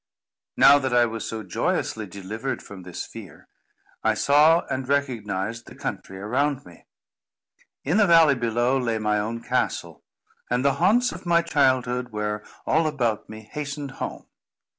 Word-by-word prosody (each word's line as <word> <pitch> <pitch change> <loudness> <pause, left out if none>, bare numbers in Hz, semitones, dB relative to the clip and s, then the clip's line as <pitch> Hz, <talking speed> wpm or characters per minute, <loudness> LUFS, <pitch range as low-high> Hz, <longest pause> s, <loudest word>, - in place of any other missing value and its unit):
Now 145 +1 +8
that 130 -3 -1
I 120 0 +5
was 115 -1 -4
so 110 -1 -5
joyously 105 +3 -2
delivered 105 +7 -5
from 100 -2 -10
this 90 -1 -6
fear, - - -12 0.6
I - - +2
saw 150 +4 +4
and 130 0 -4
recognised 115 -6 -2
the - - -12
country 95 - -6
around 130 +7 -1
me. 85 -1 -16 1.0
In 160 +8 +1
the 210 -2 +5
valley 165 -4 +6
below, 120 +1 +1
lay 115 -3 -1
my 105 -1 0
own 115 +3 -4
castle, - - -2 0.5
and 125 +2 0
the 140 - +4
haunts 240 +7 +4
of - - -9
my 170 0 +4
childhood 130 -5 +1
were 105 0 -3 0.2
all 160 0 +2
about 120 -8 -1
me 110 0 -9
hastened 145 -1 -5
home. - - -5
125 Hz, 155 wpm, -24 LUFS, 110-145 Hz, 1.0 s, Now